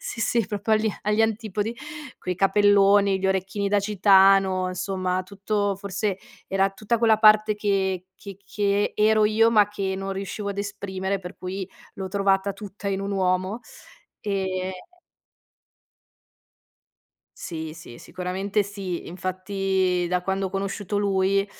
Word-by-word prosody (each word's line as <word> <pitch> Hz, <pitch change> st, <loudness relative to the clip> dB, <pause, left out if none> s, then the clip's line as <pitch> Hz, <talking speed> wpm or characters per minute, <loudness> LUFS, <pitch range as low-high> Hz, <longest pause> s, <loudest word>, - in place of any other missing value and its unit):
sì, 230 Hz, -, -6 dB
sì, 230 Hz, -2 st, +1 dB
proprio 210 Hz, +1 st, -2 dB
agli 215 Hz, 0 st, +3 dB
agli 210 Hz, +1 st, +1 dB
antipodi, 220 Hz, 0 st, -1 dB, 0.4 s
coi 180 Hz, -, -3 dB
capelloni, 200 Hz, 0 st, +4 dB
gli 190 Hz, -, 0 dB
orecchini 190 Hz, +1 st, -1 dB
da 205 Hz, -, +2 dB
gitano, 195 Hz, -2 st, +4 dB
insomma, 185 Hz, 0 st, -2 dB
tutto 200 Hz, +1 st, -2 dB
forse 200 Hz, 0 st, -2 dB, 0.3 s
era 195 Hz, 0 st, +1 dB
tutta 215 Hz, +4 st, -1 dB
quella 225 Hz, -1 st, +3 dB
parte 215 Hz, 0 st, +6 dB
che 190 Hz, -3 st, -1 dB
che 195 Hz, -2 st, -10 dB
che 200 Hz, 0 st, 0 dB
ero 215 Hz, 0 st, +4 dB
io, 225 Hz, +2 st, +4 dB
ma 210 Hz, -3 st, +4 dB
che 195 Hz, -2 st, -3 dB
non 195 Hz, 0 st, -4 dB
riuscivo 200 Hz, +1 st, -5 dB
a 200 Hz, -, -3 dB
esprimere, 200 Hz, -1 st, -3 dB
per 180 Hz, +1 st, -9 dB
cui 190 Hz, +1 st, -5 dB, 0.3 s
l'ho 190 Hz, -1 st, -5 dB
trovata 195 Hz, 0 st, +1 dB
tutta 200 Hz, -1 st, -7 dB
in 195 Hz, -1 st, -1 dB
un 200 Hz, -, -3 dB
uomo 185 Hz, +3 st, 0 dB, 0.6 s
ehm 190 Hz, -2 st, -2 dB, 2.7 s
Sì, 160 Hz, -2 st, -6 dB
sì, 160 Hz, -8 st, -12 dB
sicuramente 190 Hz, +3 st, -2 dB
sì. 195 Hz, -3 st, -6 dB
Infatti, 185 Hz, 0 st, -1 dB
da 180 Hz, 0 st, 0 dB
quando 195 Hz, +1 st, -1 dB
ho -, -, -6 dB
conosciuto 200 Hz, +1 st, -3 dB
lui, 195 Hz, 0 st, +2 dB
195 Hz, 135 wpm, -24 LUFS, 190-205 Hz, 2.7 s, parte